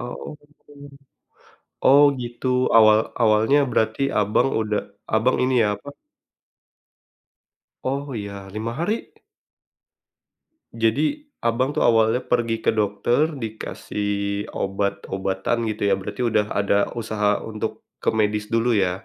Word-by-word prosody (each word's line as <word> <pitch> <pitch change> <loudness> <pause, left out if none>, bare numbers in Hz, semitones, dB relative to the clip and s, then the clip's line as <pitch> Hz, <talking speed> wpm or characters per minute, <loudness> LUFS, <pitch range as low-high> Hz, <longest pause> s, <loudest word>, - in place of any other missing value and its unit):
Oh 120 0 -7
gitu 145 0 -27 1.2
oh 140 +2 +7 0.2
gitu, 120 +1 -6 0.3
awal 110 -1 +7 0.2
awalnya 110 +5 +4
berarti 110 +3 0 0.2
Abang 105 +5 +2
udah, 105 -1 -1 0.3
Abang, 110 +4 +3
ini 130 0 +1
ya, - - +3
apa 140 - -12 2.0
Oh, 140 +1 -3
ya, 100 -2 -7
5 110 +4 -4
hari? 210 +7 -2 1.6
Jadi, 115 +5 +1 0.4
Abang 130 +5 0
tuh - - +2
awalnya 115 +1 +3
pergi 120 -2 0
ke - - +3
dokter, 110 +7 +1
dikasih 110 -3 -5 0.5
obat-obatan, 100 +2 -2
gitu 110 -1 -4
ya, 100 - +3
berarti 125 - -5
udah 105 -3 +1
ada 100 0 +1
usaha 105 -3 0
untuk 110 -1 -5 0.2
ke - - -3
medis 105 -1 0
dulu 115 +1 +1
ya? 95 -3 0
110 Hz, 115 wpm, -23 LUFS, 105-120 Hz, 2.0 s, oh